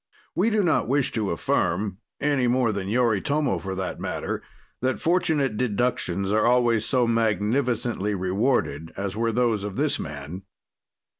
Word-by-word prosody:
We 200 +6 +2
do 215 -2 +2
not 160 -9 +2
wish 135 +1 +1
to 105 -4 -1
affirm 95 +3 0 0.2
any 140 -3 +1
more 120 -2 +2
than 100 -2 -3
Yoritomo, 125 +6 +1
for 95 -1 -5
that 95 -1 -4
matter - - -3 0.4
that 130 +1 0
fortunate 160 - +1
deductions 100 -5 0
are 110 +2 +3
always 120 -3 +3
so 125 -3 +2
magnificently 115 -1 0
rewarded 95 - 0
as 100 0 -3
were 115 +1 0
those 115 -3 +1
of 100 -2 -5
this - - 0
man. 75 +5 -6
115 Hz, 145 wpm, -25 LUFS, 100-130 Hz, 0.4 s, are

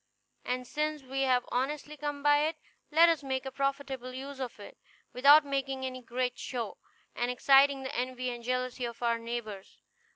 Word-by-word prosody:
And 250 0 -2
since 300 +2 -2
we 270 +1 -3
have 250 -2 +2
honestly 290 +4 -2
come 290 -1 -4
by 290 0 +5
it, 320 - -3 0.3
let 325 +2 +6
us 330 -2 +2
make 265 -1 -3
a 265 - -4
profitable 275 -2 -2
use 270 +1 -7
of 250 -4 -5
it, 205 - -12 0.3
without 285 +4 +7
making 270 -1 -2
any 255 0 -5
great 250 +1 -2
show, 235 -5 -4 0.4
and 240 +1 -1
exciting 270 +2 +5
the 265 +3 -5
envy 255 0 -2
and 240 -1 -7
jealousy 255 0 -2
of 235 0 -7
our 235 -1 +2
neighbors. 230 -4 -6
260 Hz, 175 wpm, -30 LUFS, 245-280 Hz, 0.4 s, without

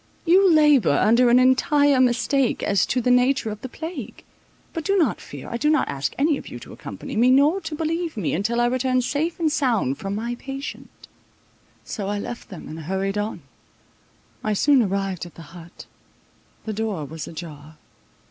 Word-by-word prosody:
You 370 +2 +5
labour 295 - +5
under 240 +3 +4
an 240 - +6
entire 265 +2 +4
mistake 255 +1 +1
as 200 -2 +2
to 250 - 0
the 250 - +2
nature 250 -2 +2
of 210 0 -8
the 260 - -6
plague; 320 - -7 0.5
but 330 - -4
do 395 +5 +1
not 340 - +1
fear, - - -10
I 235 - -3
do 300 +5 +1
not 310 -1 +2
ask 140 0 -3
any 290 +1 +2
of - - -12
you - - -8
to - - -11
accompany - - -8
me, 240 +3 +4
nor 290 +8 +4
to 320 -2 -5
believe 325 -1 -2
me, 185 -7 -1
until 220 +7 0
I 240 - +3
return 255 +1 +1
safe 310 +7 -2
and 320 -2 +1
sound 235 - 0
from 195 +1 -4
my 235 +3 -3
patient." 270 +1 -7 1.0
So 200 -4 -5
I 205 +1 -2
left 235 +4 -7
them, 185 -6 -9
and 160 - -8
hurried 190 +5 -2
on. 210 +2 -4 1.0
I 215 - 0
soon 275 +5 +4
arrived 195 -4 -2
at 175 - -17
the 165 -1 -13
hut: 170 -1 -12 0.8
the 220 - -3
door 210 -7 -3
was 155 +2 -7
ajar. 155 -2 -10
240 Hz, 185 wpm, -23 LUFS, 195-285 Hz, 1.0 s, an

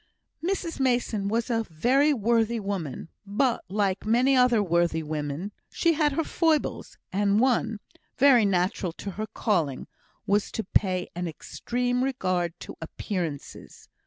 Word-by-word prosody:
Mrs 355 -3 -2
Mason 240 -6 +1
was 230 +3 -1
a 225 -1 +2
very 260 - +3
worthy 230 -2 +1
woman, 190 -7 -4
but, 230 +5 0
like 195 -1 0
many 245 +5 +3
other 250 -4 +4
worthy 170 -2 +1
women, 150 +5 -4 0.2
she 335 - +2
had 300 -2 +2
her 325 - 0
foibles; 320 -2 0 0.2
and 200 +1 +2
one 235 -3 +2 0.4
(very 260 -4 +6
natural 185 -2 0
to 200 - -6
her 215 +3 -4
calling) 160 - -1 0.4
was 205 0 +1
to 220 - -2
pay 185 -1 +1
an 175 0 -3
extreme 245 +9 -2
regard 185 -10 -1
to - - -8
appearances. 160 -3 -6
210 Hz, 135 wpm, -26 LUFS, 180-250 Hz, 0.4 s, very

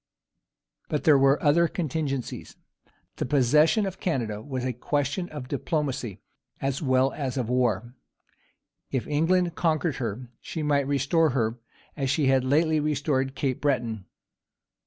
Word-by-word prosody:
But 150 - -1
there 150 -3 +6
were 135 +1 +4
other 170 +4 +4
contingencies. 150 -6 -3 0.6
The - - -1
possession 150 - +4
of 190 -1 -5
Canada 115 - -2
was 130 0 -4
a 130 - -1
question 145 +7 -2
of 145 -4 -7
diplomacy 135 - -3 0.4
as 135 0 -2
well 130 -2 +2
as 135 -2 -3
of 120 -3 -2
war. 120 -2 0 1.0
If 130 -3 -2
England 170 +4 +1
conquered 160 -3 0
her, 120 0 -4
she 160 - -5
might 140 -2 +1
restore 145 +4 +2
her, 115 0 0 0.4
as 135 -3 -2
she 140 +2 +1
had 135 -1 +3
lately 155 +4 +2
restored 145 -3 0
Cape 135 -4 -2
Breton. 120 -8 -1
140 Hz, 135 wpm, -26 LUFS, 125-155 Hz, 1.0 s, there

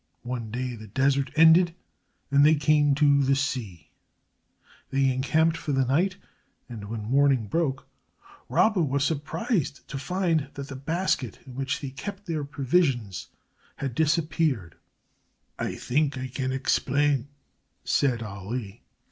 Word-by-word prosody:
One 120 -2 -4
day 125 +2 -3
the 110 -1 -10
desert 135 +5 +1
ended 165 +2 +6 0.6
and 140 0 +5
they 155 +2 +6
came 145 -1 +3
to 140 -1 +4
the 135 0 +3
sea. 110 - -3 1.0
They 135 -1 +2
encamped 160 +5 +2
for 150 -3 -3
the 135 -1 +2
night, 175 +9 +1 0.5
and 115 -4 -8
when 110 -1 -4
morning 135 -4 +3
broke 135 +2 -1 0.6
Rabba 215 -4 +3
was 140 -2 +1
surprised 160 - -2
to 135 - -5
find 165 -2 0
that 140 0 -7
the 140 - -6
basket, 165 +8 -1
in 130 - -11
which 135 0 -2
they 135 -2 -5
kept 200 +9 -7
their 160 -5 -2
provisions, 135 - 0 0.5
had 135 -3 -4
disappeared. 155 - 0 0.9
"I - - -2
think 140 +1 0
I 130 0 -4
can 130 +1 -2
explain," 140 0 +1 0.6
said 125 -5 +1
Ali. 100 +1 -6
140 Hz, 135 wpm, -26 LUFS, 130-155 Hz, 1.0 s, ended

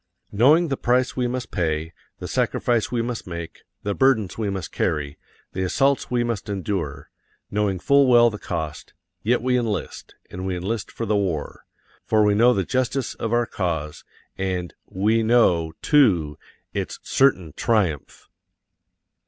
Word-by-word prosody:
Knowing 150 +11 +4
the 135 - -1
price 125 +1 +1
we 125 -1 0
must 125 0 -4
pay, 80 -2 -2 0.2
the - - -7
sacrifice 115 -3 0
we 120 -2 0
must 120 -4 -5
make, 85 -2 -7 0.2
the 100 - -1
burdens 115 -6 +2
we 110 -2 -2
must 95 -4 -4
carry, 70 -1 -2 0.3
the 95 - -3
assaults 135 +9 +1
we 120 -1 +1
must 115 -3 -3
endure 90 -8 -4 0.4
knowing 105 -2 0
full 140 +8 +4
well 120 -1 +6
the 105 - -7
cost 80 -2 -5 0.3
yet 120 +2 +1
we 125 0 +2
enlist, 115 -4 -3 0.2
and 90 - -6
we 95 - -1
enlist 100 +4 -3
for 115 - -4
the 105 -1 +1
war. 90 -7 -2 0.4
For 110 -1 +2
we 105 0 +4
know 115 +4 +5
the 100 -6 +1
justice 130 +4 -1
of 115 - -4
our 120 0 +2
cause, 80 -8 -3 0.4
and 90 -2 -2 0.2
_we 110 +4 +2
know, 90 -9 +3
too, 95 - +3 0.4
its - - -3
certain 95 - +2
triumph. 95 -11 -1
105 Hz, 155 wpm, -23 LUFS, 90-120 Hz, 0.4 s, well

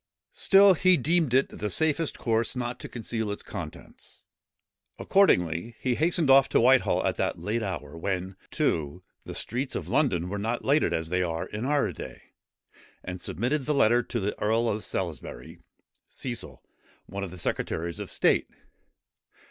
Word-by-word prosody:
Still 200 - +6
he 185 +1 +4
deemed 160 0 +2
it 130 +2 +3
the 105 - -4
safest 160 - 0
course 115 +1 0
not 120 -1 -3
to - - -8
conceal 115 -2 -4
its 100 - -5
contents. - - -9 0.7
Accordingly 100 - +2
he 125 - 0
hastened 165 +3 +1
off 135 0 +6
to - - +3
Whitehall 130 +2 +4
at - - 0
that - - -1
late 105 +7 -2
hour, 75 -8 -5
when, 95 +2 -3
too, 80 +3 -1 0.2
the - - -7
streets 130 +3 -3
of - - -4
London 90 - +1
were 100 +2 -4
not 115 +4 -2
lighted 145 +3 +3
as 80 0 -2
they 90 +1 +1
are 85 -2 -2
in 105 +4 -5
our 145 0 +1
day, - - -10 0.7
and 90 0 -6
submitted 130 - -2
the 150 - +1
letter 120 -2 +4
to 120 - -4
the 100 0 -2
earl 115 +3 +2
of 110 -1 -1
Salisbury, 85 -7 -5 0.5
Cecil, 120 -3 -5 0.4
one 100 0 -6
of 95 - -4
the 90 - -10
secretaries 85 0 -2
of - - -6
state. - - +2
115 Hz, 165 wpm, -27 LUFS, 90-135 Hz, 0.7 s, Still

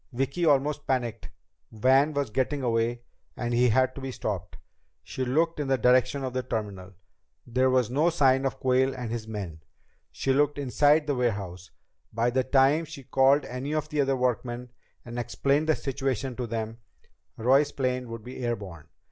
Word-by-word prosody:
Vicki 135 +7 -1
almost 145 0 +2
panicked. 120 -4 -2 0.4
Van 130 +7 +3
was 140 -5 -1
getting 135 +4 -1
away 120 0 0 0.3
and 120 -1 -2
he 125 +1 +4
had 130 +3 +2
to 140 - -9
be 135 0 -4
stopped! 95 -7 -4 0.5
She 130 - -4
looked 160 +6 +1
in 145 - -2
the 135 0 +2
direction 130 +3 +3
of 130 -1 -3
the 130 - -1
terminal. 100 -6 -5 0.5
There 130 +2 +2
was 125 -3 +2
no 150 +6 +3
sign 135 -5 +3
of 135 - -6
Quayle 130 +1 +2
and 125 -3 -5
his 115 -2 -4
men. 95 -8 -6 0.5
She 135 - 0
looked 145 +1 +2
inside 145 +3 +3
the 145 - 0
warehouse. 100 -8 -2 0.4
By 115 +2 +1
the 130 +1 +1
time 135 +5 +3
she 150 -3 -10
called 135 +2 +3
any 130 +5 -4
of 155 0 -2
the 150 -2 +1
other 135 -1 +1
workmen 125 -1 -2 0.3
and 120 0 -5
explained 140 +5 0
the 155 - +4
situation 135 -2 -3
to 125 -2 -3
them, 115 0 -4 0.6
Roy's 135 +5 +3
plane 130 -3 -2
would 115 -1 -7
be 125 +1 -8
air 120 -1 0
borne. 90 -8 -10
130 Hz, 180 wpm, -27 LUFS, 120-140 Hz, 0.6 s, he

